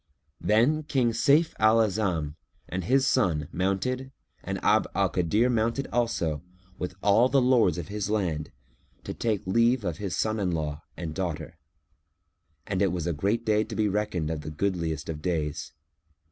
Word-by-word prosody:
Then 120 +9 +3
King 130 -6 +1
Sayf 150 +7 +3
al 110 +1 +5
A'azam 95 -8 0 0.3
and 95 0 -3
his 135 +5 +3
son 85 - +1
mounted 125 +9 -1 0.3
and - - -3
Abd - - +3
al - - +2
Kadir 100 +7 +2
mounted 115 +3 0
also 100 -11 0 0.4
with 90 0 -4
all 110 +5 +5
the 140 - +4
lords 125 -9 +3
of 85 - -6
his 105 0 -3
land, 85 -8 -1 0.5
to - - -5
take 110 -4 -1
leave 115 +4 +2
of 85 -4 -2
his 100 -2 -3
son 110 0 0
in 95 -3 0
law 75 -3 -3 0.2
and 80 -3 -5
daughter; 85 -3 -4 1.1
and 95 -2 -2
it 100 -3 +3
was 85 -3 -3
a 85 - 0
day 105 +6 +1
to - - -7
be 110 -1 +2
reckoned 100 -6 -1
of 80 -2 -3
the 75 - -6
goodliest 80 -2 -2
of 75 -2 -5
days. 75 -4 -2
100 Hz, 165 wpm, -27 LUFS, 85-115 Hz, 1.1 s, al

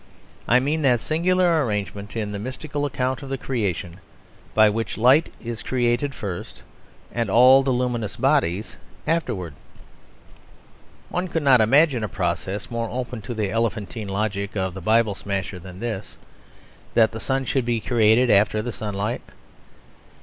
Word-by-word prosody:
I 125 +3 +5
mean 150 +5 -1
that 125 -5 +3
singular 170 +4 +2
arrangement 105 -2 -4
in 105 -2 -2
the 100 - -4
mystical 145 +5 -4
account 130 -2 -2
of 135 - -8
the 135 - -2
Creation 100 -9 -3 0.6
by 110 0 +7
which 110 +1 -2
light 130 +8 +4
is 115 -2 -6
created 125 +2 0
first 95 -6 -6 0.5
and 115 -3 -1
all 130 +5 +7
the 135 - -1
luminous 125 -4 -1
bodies 130 - 0 0.3
afterwards. 95 - -2 1.5
One 180 +1 -2
could 165 -3 -2
not 130 -4 +6
imagine 135 +1 +4
a 105 - -2
process 95 +4 -3
more 115 -1 -2
open 125 -1 -4
to 120 +4 -6
the 105 -3 -1
elephantine 115 -1 -2
logic 100 +1 -2
of 95 -1 -1
the 95 - -7
Bible 110 +2 +3
smasher 95 -1 -4
than 90 +1 -11
this: 110 -3 -5 0.8
that 110 -1 +5
the 110 - -6
sun 135 +3 -1
should 130 0 0
be 120 -1 0
created 115 +1 +3
after 105 +1 +3
the 120 - -3
sunlight. 105 +1 -3
115 Hz, 150 wpm, -23 LUFS, 105-130 Hz, 1.5 s, by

